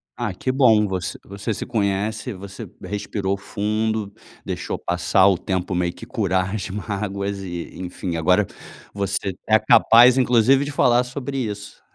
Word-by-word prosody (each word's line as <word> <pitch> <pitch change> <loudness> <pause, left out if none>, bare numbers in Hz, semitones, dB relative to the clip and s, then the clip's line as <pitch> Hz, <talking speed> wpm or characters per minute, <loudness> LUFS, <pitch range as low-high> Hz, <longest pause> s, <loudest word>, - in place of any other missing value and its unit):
Ah, 120 -5 -3
que 130 +8 -2
bom. 115 -6 +4
Você 95 -1 -3
você 100 +3 -4
se - - -5
conhece, 110 +1 -1
você 100 +3 -9 0.2
respirou 100 -1 -3
fundo, 105 +1 -2 0.3
deixou - - -3
passar 90 +2 +2
o 95 -3 +3
tempo 95 0 -2
meio 90 -1 0
que - - -11
curar 95 -5 -1
as 105 - -4
mágoas. 100 0 -3
E, 85 -2 -5
enfim, 90 -1 -4
agora 90 +5 +3 0.5
você 100 -1 -2
é 110 0 +5
capaz 120 +3 +6
inclusive 125 +2 +4
de 145 - -4
falar 125 -3 +3
sobre 135 +2 -5
isso. 105 -4 -5
100 Hz, 150 wpm, -22 LUFS, 95-115 Hz, 0.5 s, capaz